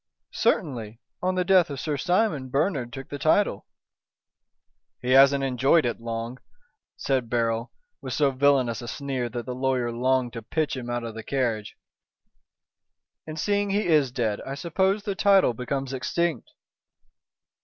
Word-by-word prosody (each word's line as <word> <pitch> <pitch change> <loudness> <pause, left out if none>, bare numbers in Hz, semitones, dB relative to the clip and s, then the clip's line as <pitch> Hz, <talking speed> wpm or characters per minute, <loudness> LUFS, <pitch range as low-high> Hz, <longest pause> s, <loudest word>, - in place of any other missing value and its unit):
"Certainly. 120 - -1 0.2
On 185 +1 0
the 180 -1 0
death 185 -3 +4
of 140 -2 -5
Sir 150 0 -2
Simon, 175 -4 0
Bernard 135 -3 0
took 135 0 -8
the 145 - -6
title!" 160 - +2 1.3
"He 125 - -2
hasn't 135 +1 +6
enjoyed 135 +4 +3
it 120 -1 -2
long," 115 +2 -5 0.6
said 130 -4 -1
Beryl, 115 0 0 0.3
with - - -5
so 145 -2 +2
villainous 130 -4 +2
a 120 - -7
sneer 130 -1 -3
that 120 0 -5
the 125 - -4
lawyer 130 -2 0
longed 125 +1 0
to 115 - -6
pitch 155 +8 -1
him 125 -2 -6
out 120 0 -2
of 115 -1 -5
the 110 - -7
carriage, 115 -5 -2 1.5
"and 155 0 -6
seeing 205 +2 0
he 205 +2 0
is 150 -7 +3
dead 115 -5 -1
I 135 - -6
suppose 190 +6 0
the 200 - -2
title 195 - +4
becomes 135 +3 -3
extinct." 170 +5 -1
135 Hz, 155 wpm, -25 LUFS, 120-160 Hz, 1.5 s, hasn't